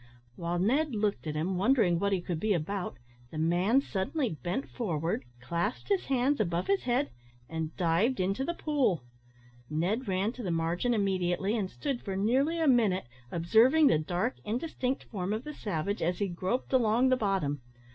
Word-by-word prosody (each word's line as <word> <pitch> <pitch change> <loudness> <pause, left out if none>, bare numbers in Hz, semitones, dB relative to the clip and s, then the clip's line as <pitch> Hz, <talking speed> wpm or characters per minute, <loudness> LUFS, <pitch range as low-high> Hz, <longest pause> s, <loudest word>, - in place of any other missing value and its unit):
While 170 +3 -2
Ned 260 - +1
looked 205 -5 -1
at 155 - -3
him, 175 +5 -1
wondering 195 -6 +3
what 200 +2 +1
he 190 -2 +1
could 175 -2 -3
be 215 +2 +2
about, 180 -4 -3 0.3
the 155 - -8
man 175 - +3
suddenly 250 +5 -1
bent 175 - -3
forward, 165 - -2
clasped 170 - -2
his 395 -2 +1
hands 270 +1 +1
above 175 -4 0
his 395 -6 +1
head, 255 +3 +1 0.4
and 160 -1 -4
dived 185 +9 +2
into 195 +7 0
the 345 +5 -2
pool. 270 - +1 0.7
Ned 185 - -1
ran 190 +3 +1
to 250 - -9
the 195 - -3
margin 170 +8 0
immediately, 190 0 0
and 200 -5 -1
stood 275 +1 -3
for 195 -2 -4
nearly 265 - +2
a 320 - +2
minute 220 - +3 0.3
observing 230 - +5
the 160 - +5
dark 180 +10 -1
indistinct 255 +3 -2
form 195 -2 -3
of 220 +3 -3
the 300 +1 -6
savage 200 - -3
as 175 +2 0
he 200 - 0
groped 190 +9 -2
along 245 +1 +4
the 255 - +5
bottom. 190 - 0
200 Hz, 175 wpm, -30 LUFS, 175-250 Hz, 0.7 s, observing